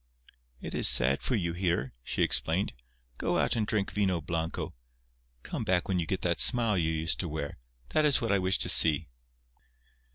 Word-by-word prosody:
"It - - -9
is - - +3
sad 65 +2 +2
for 130 - -2
you 85 -6 -3
here," 85 -8 -3
she - - -2
explained. 85 0 0 0.5
"Go - - -1
out - - 0
and 110 -2 -2
drink 105 -4 -2
vino 95 -4 -1
blanco. 80 0 -5 0.7
Come - - -6
back 90 -2 -1
when 95 -2 -1
you 80 - -4
get 95 - -3
that 85 -2 -2
smile 115 -4 +3
you 80 -3 -1
used 80 -5 -1
to - - -4
wear. 75 -4 -6 0.3
That 155 - 0
is 145 -2 +2
what 115 -4 -3
I 100 - +1
wish 95 0 +1
to - - +1
see." 80 -1 +7
90 Hz, 190 wpm, -28 LUFS, 80-100 Hz, 0.7 s, see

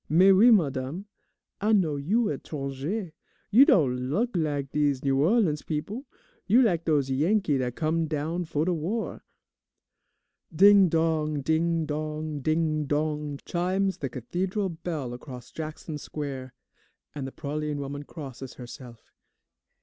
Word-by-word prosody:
"Mais 185 +5 +6
oui, 215 +6 +7
madame, 150 - +1 0.6
I 215 +2 +2
know 170 -8 +3
you 205 +10 +1
etranger. 145 +7 -4 0.4
You 250 +7 +8
don' 130 - +2
look 230 - 0
lak 145 -5 -1
dese 145 -3 +1
New 135 -1 +2
Orleans 170 -3 +2
peop'. 150 +4 -4 0.6
You 235 +6 +6
lak' 175 -7 +1
dose 145 -4 +1
Yankee 155 +1 +2
dat 125 -1 -2
come 160 +1 0
down 160 +3 -2
'fo' 155 -1 -1
de 180 - +1
war." 180 +8 -3 1.3
Ding 195 +2 +7
dong, 155 -2 +1
ding 160 +2 +1
dong, 155 0 -3
ding 155 +1 0
dong, 150 0 -2
chimes 185 +2 0
the 135 - -3
Cathedral 185 - -2
bell 160 -7 -4
across 125 -1 -10
Jackson 155 -1 -6
Square, 135 -4 -6 0.6
and 140 -3 -5
the - - -7
praline 150 +1 -3
woman 140 0 -5
crosses 135 -4 -9
herself. 120 -2 -11
155 Hz, 135 wpm, -27 LUFS, 140-175 Hz, 1.3 s, You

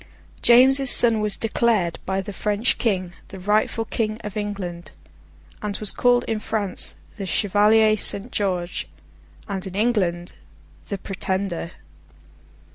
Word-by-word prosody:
James's 265 +3 +6
son 230 -3 +5
was 210 -2 +1
declared, 220 -6 0
by 190 +1 0
the 205 +1 -7
French 210 +4 0
King, 185 -6 -1
the 190 - -10
rightful 210 +3 0
King 215 -2 -2
of 210 0 -7
England; 185 -6 -5 0.7
and 205 -1 -3
was 215 - +2
called 245 -1 +2
in 220 -1 -2
France 210 -3 -1 0.2
The 195 -2 -5
Chevalier 215 +3 +3
Saint 205 +3 -1
George, 180 -4 -2 0.6
and 195 -2 -4
in 185 - -8
England 195 -6 0 0.6
The 200 - -2
Pretender. 190 -2 -4
205 Hz, 125 wpm, -22 LUFS, 190-220 Hz, 0.7 s, James's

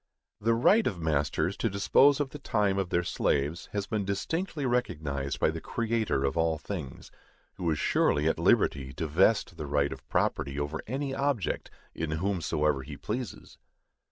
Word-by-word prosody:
The 115 +2 +2
right 205 - +4
of 95 -7 -2
masters 80 +3 0
to 115 - 0
dispose 130 +8 +4
of 140 -2 -1
the 150 - -8
time 105 -6 +1
of 95 -2 -1
their 90 0 +1
slaves 75 0 -1
has 100 -1 -2
been 105 0 -1
distinctly 145 - -2
recognized 75 - -1
by - - +3
the 80 0 -6
Creator 115 -11 -1
of 70 - 0
all 80 -1 +1
things, 80 -6 -7 0.5
who 85 -2 -1
is 80 - +1
surely 75 +2 +2
at 80 - +1
liberty 65 -1 +2
to 80 - -3
vest 85 +3 +2
the 75 - -5
right 70 0 +1
of - - -14
property 70 +1 0
over 75 +2 -3
any 135 +3 -2
object 135 - -1 0.2
in 80 -1 -3
whomsoever 80 -5 0
he 70 +2 -8
pleases. 120 +2 -6
90 Hz, 170 wpm, -29 LUFS, 75-115 Hz, 0.5 s, right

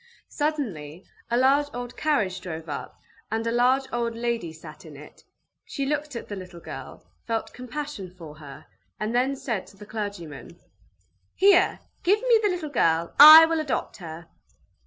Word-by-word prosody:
Suddenly 200 - -4 0.2
a 235 - +1
large 275 +3 +3
old 245 0 -6
carriage 205 -12 0
drove 165 -3 -7
up, 145 - -7 0.3
and 225 +1 -2
a 230 - 0
large 250 +3 +3
old 235 -1 -2
lady 235 -7 -2
sat 155 -1 -13
in 150 -3 -12
it: 150 - -15 0.4
she 275 - -4
looked 295 0 -3
at 235 - -6
the 205 - -6
little 185 -2 -10
girl, - - -10 0.2
felt 225 -1 -3
compassion 250 -5 -6
for 165 -4 -12
her, 140 -2 -12 0.3
and 215 +2 -2
then 255 +3 +1
said 230 -7 -4
to 200 - -17
the 210 - -12
clergyman: 180 -7 -7 0.8
"Here, 385 -1 +4 0.2
give 400 +4 +3
me 485 -2 +4
the 415 - +2
little 350 -5 -4
girl. 165 - +1
I 310 +2 +12
will 325 0 -1
adopt 300 -4 -3
her!" 165 -2 -9
230 Hz, 165 wpm, -25 LUFS, 175-290 Hz, 0.8 s, I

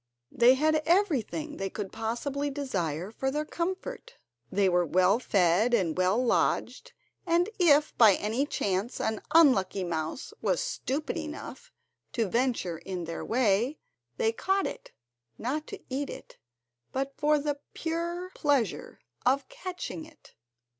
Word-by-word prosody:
They 245 +2 +6
had 310 +2 +2
everything 320 - +1
they 195 0 -2
could 195 -1 -5
possibly 265 +6 -2
desire 190 - -3
for 265 +4 -2
their 300 +3 -2
comfort, 375 +10 -4 0.4
they 195 0 +3
were 180 -1 +3
well 185 +6 +3
fed 200 +2 +3
and 180 -8 0
well 185 +3 +2
lodged, 255 - 0 0.3
and 345 +4 +2
if 300 -4 +4
by 215 -5 +8
any 230 +7 -1
chance 200 -1 -1
an 220 -1 -1
unlucky 200 - +5
mouse 165 - -4
was - - +1
stupid 310 - -2
enough 325 +10 -7 0.4
to 230 -4 +1
venture 230 -7 0
in 185 -2 -5
their 165 0 -5
way, 235 +3 +1 0.4
they 225 - +2
caught 385 +11 0
it, - - -6 0.5
not 295 +6 -3
to - - -7
eat 275 +2 -3
it, - - -10 0.5
but 270 +1 -2
for 300 0 +3
the 290 0 -2 0.2
pure 340 +2 -3
pleasure 285 -6 0 0.2
of 270 +3 +2
catching 365 -8 -6
it. 315 -1 -19
260 Hz, 140 wpm, -29 LUFS, 200-310 Hz, 0.5 s, by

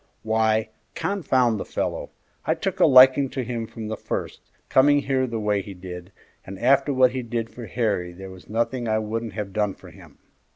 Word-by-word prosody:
"Why, 110 0 +1 0.3
confound 130 - +1
the - - -3
fellow! - - -3 0.3
I - - +1
took - - -3
a - - +6
liking 130 +1 +7
to 130 0 -3
him 115 -2 -4
from 110 -1 -7
the 110 - -3
first, - - -5 0.3
coming 145 +2 +4
here 130 -1 0
the 115 -2 -3
way 105 -1 0
he 100 0 -9
did, 90 0 -9 0.3
and 95 +1 -9
after 135 +6 +3
what 130 -2 +4
he 130 0 -3
did 115 -1 -4
for 120 -2 -9
Harry 100 -5 -1
there 95 +2 -10
was 95 -1 -14
nothing 120 +2 -1
I 110 0 +1
wouldn't 110 +1 -3
have 105 -3 -5
done 105 -1 0
for - - -14
him. - - -16
115 Hz, 200 wpm, -24 LUFS, 105-130 Hz, 0.3 s, liking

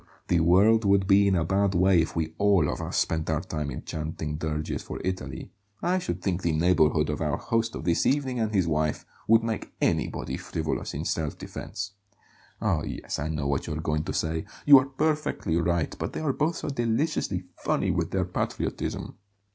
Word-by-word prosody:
"Well, - - -29 0.2
the 85 - +4
world 100 +7 +5
would 100 -1 +3
be 100 +1 +5
in 95 - +3
a 85 - +2
bad 95 +2 +1
way 90 -1 +5
if 80 - -3
we 80 -1 -1
ALL 100 -6 +4
of - - -3
us - - -3
spent 80 -1 0
our 80 -1 +1
time 75 -3 -4
in 65 - -6
chanting 80 -1 -4
dirges 75 0 -3
for - - -7
Italy. 85 -8 -4 0.3
I 180 +2 +2
should 180 - -4
think 95 -2 0
the 85 -3 +1
neighbourhood 80 -2 +3
of 75 - -4
our 75 -2 0
host 115 0 -1
of - - -5
this 85 0 +2
evening 135 -3 +1
and 110 -1 0
his 95 -5 +2
wife 75 -1 0 0.2
would 115 +1 +5
make 115 -2 -3
anybody - - 0
frivolous, 80 -2 -3
in - - -3
self 80 -3 -2
defence. 105 -2 -6 0.7
Oh, - - +1
yes, - - -4
I 75 - -2
know 75 -3 -2
what 70 0 -1
you're 75 - -3
going 75 -1 -1
to 95 - -3
say; 80 +3 -1 0.2
you 140 -2 +10
are 130 - -2
perfectly 150 - -1
right, 85 -1 0
but - - -3
they - - -4
are 145 -4 +1
both 155 +4 0
so - - -4
deliciously 120 - 0 0.2
funny - - +1
with - - -1
their - - 0
patriotism. - - -3
90 Hz, 205 wpm, -27 LUFS, 80-110 Hz, 0.7 s, you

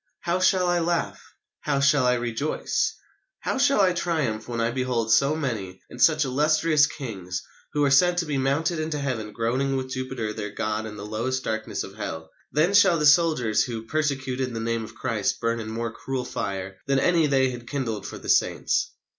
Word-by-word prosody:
How 175 +1 0
shall 185 0 +3
I 175 0 +2
laugh? 170 0 -1 0.4
How 145 -2 0
shall 140 -2 +4
I 125 - +4
rejoice? 120 +5 -1 0.5
How - - -2
shall 275 -5 +4
I 185 -2 +4
triumph 155 -12 -1
when 120 -1 -3
I 115 +1 +1
behold 120 -3 0
so 140 +5 +3
many 110 -11 -4
and 125 - -8
such 155 0 +5
illustrious 150 +3 +3
kings, 95 - -6 0.3
who 150 - 0
were 140 -1 +3
said 175 +6 +5
to 175 - +1
be 145 -3 -1
mounted 155 +5 0
into 155 -1 -2
heaven 125 -7 -3
groaning 130 +5 0
with 130 0 -4
Jupiter 130 -4 -3
their 105 -1 -5
god 110 +1 -3
in 105 - -8
the - - -7
lowest 120 +5 -2
darkness 110 0 -3
of - - -10
Hell! 80 0 -6 0.2
Then 160 +6 +2
shall 195 -4 +6
the 150 - 0
soldiers 145 -8 +4
who 115 -3 -5
persecuted 130 -3 -1
the - - -2
name 115 0 -1
of 110 +1 -10
Christ 115 -4 -1
burn 115 0 0
in 110 -1 -5
more 115 0 -3
cruel 130 +1 -4
fire 95 -6 -4
than 135 0 +2
any 165 +2 +3
they 135 -2 +2
had 120 -1 -9
kindled 125 -7 -3
for - - -7
the - - -11
saints.... 485 - +2
130 Hz, 195 wpm, -25 LUFS, 115-155 Hz, 0.5 s, shall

